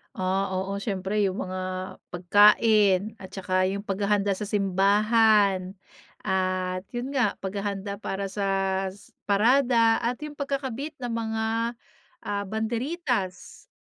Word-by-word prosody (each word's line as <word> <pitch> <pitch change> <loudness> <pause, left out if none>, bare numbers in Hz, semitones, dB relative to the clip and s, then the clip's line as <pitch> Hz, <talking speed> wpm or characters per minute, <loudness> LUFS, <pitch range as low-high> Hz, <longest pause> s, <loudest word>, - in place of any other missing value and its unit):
Ah, 190 -1 0
oo, 195 +2 -2
siyempre 200 0 -2
yung 190 +1 -3
mga, 185 0 -5 0.5
pagkain, 205 +2 +4
at 190 0 -10
saka 185 -1 +1
yung 200 +1 -3
paghahanda 200 0 0
sa 200 +1 -3
simbahan, 200 0 +3 0.5
at 185 -1 -1
'yon 245 +3 -3
nga, 255 -7 +1
paghahanda 200 0 -4
para 195 -2 -4
sa 195 -1 0 0.4
parada, 230 +2 +4
at 240 +1 -1
yung 300 - -5
pagkakabit 275 +1 -3
ng 240 - -2
mga, 225 -1 -2 0.8
ah, 205 0 -2
banderitas, 225 - -3
200 Hz, 115 wpm, -26 LUFS, 190-225 Hz, 0.8 s, pagkain